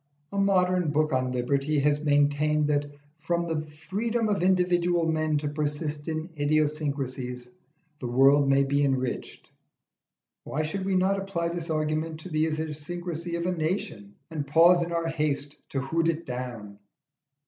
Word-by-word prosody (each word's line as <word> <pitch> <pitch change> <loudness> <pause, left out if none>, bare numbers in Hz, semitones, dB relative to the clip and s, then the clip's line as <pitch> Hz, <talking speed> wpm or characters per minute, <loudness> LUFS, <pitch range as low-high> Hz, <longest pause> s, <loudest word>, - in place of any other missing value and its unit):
A 200 - -5
modern 185 -3 +2
book 155 0 +1
on 130 -1 +1
Liberty 135 +4 0
has 145 +1 +2
maintained 145 +1 +2
that 145 0 +1 0.3
from 170 +2 -1
the 160 -2 -1
freedom 215 +10 -2
of 200 -3 0
individual 175 -2 +2
men 155 -1 +1
to 145 0 -2
persist 150 0 -2
in 155 0 -2
idiosyncrasies 140 -5 -1 0.5
the 125 - -4
world 135 +3 +5
may 135 0 +4
be 140 +1 +1
enriched. 130 -3 -2 0.9
Why 155 - -2
should 190 +5 -3
we 195 -1 +1
not 190 +2 +2
apply 175 -4 -2
this 170 -1 -4
argument 155 +1 -1
to 185 - -9
the 155 0 +1
idiosyncrasy 160 +2 -4
of 170 0 -2
a 180 - +1
nation, 155 - -3 0.2
and 150 -3 -4
pause 170 +4 +6
in 170 0 -2
our 170 -1 -1
haste 150 -3 -1
to 135 - -2
hoot 165 +5 0
it 165 0 -1
down? 120 -5 -6
155 Hz, 155 wpm, -27 LUFS, 145-170 Hz, 0.9 s, pause